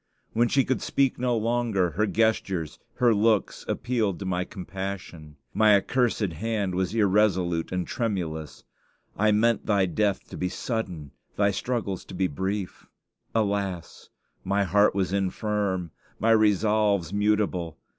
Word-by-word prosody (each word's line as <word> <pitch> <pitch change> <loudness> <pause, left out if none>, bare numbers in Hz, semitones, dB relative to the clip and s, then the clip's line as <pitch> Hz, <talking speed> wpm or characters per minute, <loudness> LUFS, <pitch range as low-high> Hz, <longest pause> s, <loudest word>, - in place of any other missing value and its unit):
When 120 +1 +3
she 135 +2 +2
could 130 - -1
speak 135 -3 +1
no 125 -1 +1
longer, 110 -5 0
her 105 +7 0
gestures, 100 -7 0 0.2
her 120 -2 +4
looks 110 0 +1
appealed 115 -7 -1
to 100 - -6
my 90 -1 -1
compassion. 95 -5 -7 0.2
My 110 -1 +5
accursed 120 +4 +1
hand 100 +1 -1
was 95 +3 -1
irresolute 95 -5 +2
and 90 -1 -1
tremulous. 85 -10 -3 0.5
I 105 +1 +3
meant 115 +2 +2
thy 100 -3 +3
death 100 +2 -1
to - - -8
be 90 - -1
sudden, 90 - -4 0.2
thy 100 0 +2
struggles 100 -3 -3
to - - -9
be 95 - +1
brief. 95 +5 -4 0.5
Alas! 100 -5 -2 0.3
my 100 +1 +1
heart 100 +3 +3
was 95 -1 0
infirm, 100 -2 -1 0.3
my 115 +2 +3
resolves 105 -3 +3
mutable. 105 -5 0
100 Hz, 135 wpm, -26 LUFS, 90-110 Hz, 0.5 s, My